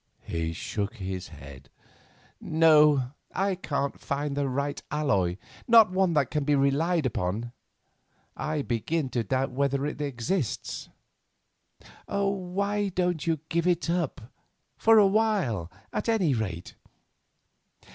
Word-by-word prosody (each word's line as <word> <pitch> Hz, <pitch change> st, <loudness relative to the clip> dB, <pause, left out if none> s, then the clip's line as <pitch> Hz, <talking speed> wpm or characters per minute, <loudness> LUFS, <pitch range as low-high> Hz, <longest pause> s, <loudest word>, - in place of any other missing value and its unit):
He 85 Hz, 0 st, -2 dB
shook 100 Hz, +6 st, -4 dB
his 95 Hz, -3 st, -5 dB
head. 70 Hz, -3 st, -12 dB, 0.7 s
"No, 150 Hz, -5 st, +4 dB, 0.2 s
I 195 Hz, +1 st, +1 dB
can't 140 Hz, -6 st, -3 dB
find 140 Hz, 0 st, -3 dB
the 140 Hz, -1 st, 0 dB
right 140 Hz, +2 st, -2 dB
alloy—not 150 Hz, -, +2 dB
one 185 Hz, -2 st, +2 dB
that 145 Hz, -4 st, +1 dB
can 150 Hz, -2 st, 0 dB
be 145 Hz, +1 st, +2 dB
relied 145 Hz, +4 st, +2 dB
upon. 110 Hz, +1 st, -2 dB, 0.8 s
I 150 Hz, -2 st, -2 dB
begin 135 Hz, +5 st, -1 dB
to 120 Hz, -2 st, -1 dB
doubt 130 Hz, +5 st, -1 dB
whether 140 Hz, +1 st, 0 dB
it 150 Hz, 0 st, -4 dB
exists." 140 Hz, -, -3 dB, 1.2 s
"Why 200 Hz, +1 st, -1 dB
don't 180 Hz, -3 st, -1 dB
you 160 Hz, -3 st, 0 dB
give 170 Hz, +2 st, 0 dB
it 170 Hz, -1 st, +1 dB
up—for 170 Hz, -, -1 dB
a 210 Hz, -, +7 dB
while 195 Hz, -, +1 dB, 0.2 s
at -, -, -2 dB
any 190 Hz, -10 st, +2 dB
rate?" 95 Hz, -7 st, -4 dB
145 Hz, 115 wpm, -27 LUFS, 120-180 Hz, 1.2 s, a